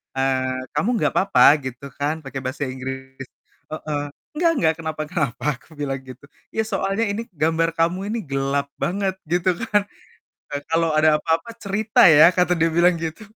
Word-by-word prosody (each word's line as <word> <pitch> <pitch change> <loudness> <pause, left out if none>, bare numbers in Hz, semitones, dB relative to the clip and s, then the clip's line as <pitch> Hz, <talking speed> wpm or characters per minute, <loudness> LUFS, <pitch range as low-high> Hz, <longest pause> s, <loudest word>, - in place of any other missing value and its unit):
eee, 130 -1 -1
"Kamu 225 - +1
nggak - - +1
apa-apa?" 135 -11 +4 0.2
Gitu 130 +1 -7
kan 150 +3 -1
pakai 135 0 -6
bahasa 130 +3 -3
Inggris. 130 +1 -7 0.5
Heeh 150 -2 -3 0.3
"Nggak, 335 +1 +3
nggak 160 -1 +3
kenapa 160 -1 -4
kenapa." 150 -7 -2
Aku 140 - -23
bilang 135 -2 -2
gitu. 130 +2 -12 0.3
"Iya 220 - 0
soalnya 195 +1 -1
ini 225 +3 -3
gambar 165 +1 +1
kamu 170 +3 +2
ini 230 - -1
gelap 135 +1 0
banget," 190 +1 -1 0.2
gitu 180 +1 +2 0.2
kan. 205 -1 +4 0.7
"Eee, 145 -1 -4
kalau 165 0 +2
ada 155 0 +5
apa-apa 165 +6 0
cerita 205 +2 +1
ya." 160 +3 +7
Kata 180 -1 +2
dia 165 0 +2
bilang 170 0 +4
gitu. 165 +5 -5
160 Hz, 165 wpm, -22 LUFS, 135-180 Hz, 0.7 s, ya